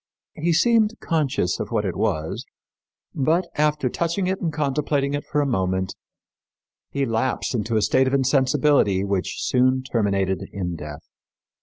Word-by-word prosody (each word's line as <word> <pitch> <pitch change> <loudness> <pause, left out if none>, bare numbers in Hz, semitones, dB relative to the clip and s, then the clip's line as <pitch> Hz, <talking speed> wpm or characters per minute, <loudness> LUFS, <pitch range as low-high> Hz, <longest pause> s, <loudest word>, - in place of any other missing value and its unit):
He 170 +3 -1
seemed 220 +6 +3
conscious 145 - 0
of - - -3
what 110 -3 0
it 95 - -2
was; 95 -7 -1 0.7
but, 165 +6 +1
after 150 -2 +1
touching 170 +8 -1
it 190 +1 -1
and 165 - 0
contemplating 145 -1 0
it 145 - -2
for 150 - 0
a - - +1
moment, 95 -6 -1 1.0
he 140 -1 -1
lapsed 115 +3 -1
into 110 -1 0
a 105 - +2
state 130 0 +3
of 130 - -1
insensibility 135 -6 +3
which 100 -2 -1
soon 130 +1 +2
terminated 100 -6 -1
in 90 -3 -3
death. 75 -2 -9
130 Hz, 150 wpm, -23 LUFS, 100-150 Hz, 1.0 s, seemed